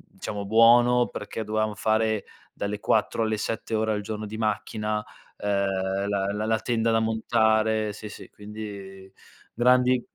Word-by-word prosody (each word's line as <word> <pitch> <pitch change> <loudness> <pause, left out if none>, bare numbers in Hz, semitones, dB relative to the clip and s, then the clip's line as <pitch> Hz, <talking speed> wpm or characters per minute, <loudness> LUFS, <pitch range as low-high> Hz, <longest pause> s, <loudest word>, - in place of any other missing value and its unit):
diciamo 100 +1 -5
buono, 120 +3 +5
perché 110 - -6
dovevamo 110 0 -1
fare 110 0 +1 0.3
dalle 100 0 -4
4 110 +2 +1
alle 110 0 0
7 110 +1 -3
ore 110 0 0
al 105 -1 -1
giorno 110 +1 -5
di 105 +1 -7
macchina, 105 0 -2 0.3
ehm, 100 -1 -1
la 100 -1 0
la 105 +1 -2
la 110 0 +1
tenda 115 -2 0
da 115 - +3
montare, 110 -1 +1
sì 105 +1 -9
sì, 105 - -11
quindi 100 -2 -9 0.4
grandi 125 +1 +3
110 Hz, 150 wpm, -26 LUFS, 105-110 Hz, 0.4 s, buono